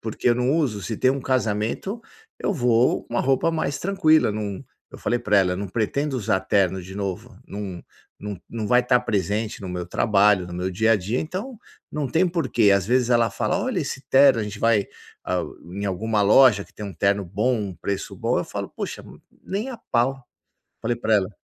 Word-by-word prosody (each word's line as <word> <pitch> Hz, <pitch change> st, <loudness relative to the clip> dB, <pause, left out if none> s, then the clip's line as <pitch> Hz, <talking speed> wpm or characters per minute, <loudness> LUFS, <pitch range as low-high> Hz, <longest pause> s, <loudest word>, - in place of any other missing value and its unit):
Porque 110 Hz, +2 st, -2 dB
eu 120 Hz, -, +5 dB
não 125 Hz, +2 st, +1 dB
uso, 140 Hz, -10 st, 0 dB
se 110 Hz, -, -4 dB
tem 130 Hz, -, +3 dB
um 135 Hz, 0 st, -1 dB
casamento, 125 Hz, -, -1 dB, 0.4 s
eu -, -, -1 dB
vou 125 Hz, -, +2 dB
com -, -, -10 dB
uma -, -, +2 dB
roupa 135 Hz, +4 st, +2 dB
mais 145 Hz, -4 st, -2 dB
tranquila, 160 Hz, -, +3 dB
não 105 Hz, -2 st, -4 dB, 0.3 s
eu -, -, -11 dB
falei 120 Hz, -, 0 dB
para 105 Hz, -3 st, +2 dB
ela, 90 Hz, -2 st, +2 dB
eu 90 Hz, -, -3 dB
não 100 Hz, 0 st, -4 dB
pretendo 135 Hz, +7 st, -1 dB
usar 95 Hz, -3 st, +1 dB
terno 95 Hz, -2 st, +1 dB
de 95 Hz, +2 st, -10 dB
novo, 100 Hz, -3 st, -5 dB
não 100 Hz, -3 st, -6 dB, 0.4 s
não 100 Hz, -3 st, -6 dB
não 110 Hz, -3 st, -4 dB
vai 125 Hz, 0 st, +5 dB
estar 125 Hz, 0 st, +3 dB
presente 105 Hz, -1 st, -2 dB
no 95 Hz, -, -6 dB
meu 90 Hz, -1 st, -4 dB
trabalho, 100 Hz, -2 st, +3 dB
no 90 Hz, -, -9 dB
meu 90 Hz, +1 st, -2 dB
dia 110 Hz, +5 st, +2 dB
a 115 Hz, -, +4 dB
dia, 105 Hz, +6 st, -2 dB
então, 200 Hz, +9 st, -5 dB, 0.3 s
não 150 Hz, -2 st, -2 dB
tem 165 Hz, +8 st, +2 dB
porquê, 140 Hz, -, +2 dB
às 100 Hz, -1 st, +3 dB
vezes 125 Hz, 0 st, +2 dB
ela 120 Hz, -1 st, +3 dB
fala: 185 Hz, -, -1 dB
"Olha 205 Hz, -2 st, -1 dB
esse 135 Hz, -3 st, -4 dB
terno", 135 Hz, -2 st, +6 dB
a -, -, -1 dB
gente 105 Hz, 0 st, -7 dB
vai, 110 Hz, -3 st, +3 dB, 0.4 s
a 90 Hz, -1 st, 0 dB, 0.3 s
em 100 Hz, +1 st, -4 dB
alguma 105 Hz, +3 st, -1 dB
loja 105 Hz, 0 st, +6 dB
que -, -, -23 dB
tem 105 Hz, -, -7 dB
um 95 Hz, -, -8 dB
terno 100 Hz, +3 st, +1 dB
bom, 110 Hz, +8 st, 0 dB
um 100 Hz, -3 st, -4 dB
preço 95 Hz, +4 st, -4 dB
bom, -, -, 0 dB
eu -, -, -1 dB
falo: -, -, -5 dB
"Poxa, -, -, -6 dB, 0.4 s
nem 210 Hz, +7 st, -3 dB
a 245 Hz, -, -6 dB
pau", 130 Hz, -, -1 dB, 0.6 s
falei 120 Hz, +1 st, -1 dB
para 110 Hz, -1 st, +1 dB
ela. 100 Hz, 0 st, 0 dB
110 Hz, 215 wpm, -23 LUFS, 100-130 Hz, 0.6 s, terno